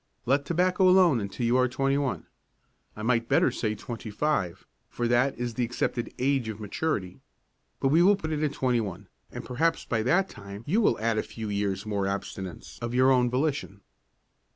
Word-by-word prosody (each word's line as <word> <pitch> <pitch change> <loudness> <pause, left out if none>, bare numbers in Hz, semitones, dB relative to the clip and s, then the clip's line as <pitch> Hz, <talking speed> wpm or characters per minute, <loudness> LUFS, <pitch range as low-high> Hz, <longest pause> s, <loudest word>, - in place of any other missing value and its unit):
Let 140 +3 +2
tobacco 180 +3 +3
alone 180 -8 +5
until 100 +4 -3
you 120 +2 +3
are 130 0 +4
twenty 135 +2 0
one. 140 -3 -2 0.7
I 110 - -7
might 115 0 +1
better - - +4
say 110 -2 -2
twenty 115 0 -7
five, 105 - -1 0.2
for 120 - -2
that 120 +3 +2
is 120 0 -3
the 125 - -1
accepted 120 0 -2
age 130 -3 +1
of 110 -1 -6
maturity. 105 - -3 0.6
But 135 - +2
we 160 +5 +5
will 200 +3 +6
put 160 -5 -5
it 155 -1 -1
at 150 -2 +1
twenty 125 -4 +1
one 100 -5 -7 0.2
and - - -7
perhaps 160 +7 0
by 115 -2 0
that 175 - +2
time 100 - -10
you 205 +10 +2
will - - +2
add 110 0 +1
a - - +2
few 110 -2 -7
years' 100 0 -1
more 100 -2 -1
abstinence 95 -2 -6
of 120 +1 -3
your 130 +1 +5
own 125 -2 +3
volition." 130 -6 -2
120 Hz, 195 wpm, -27 LUFS, 110-145 Hz, 0.7 s, will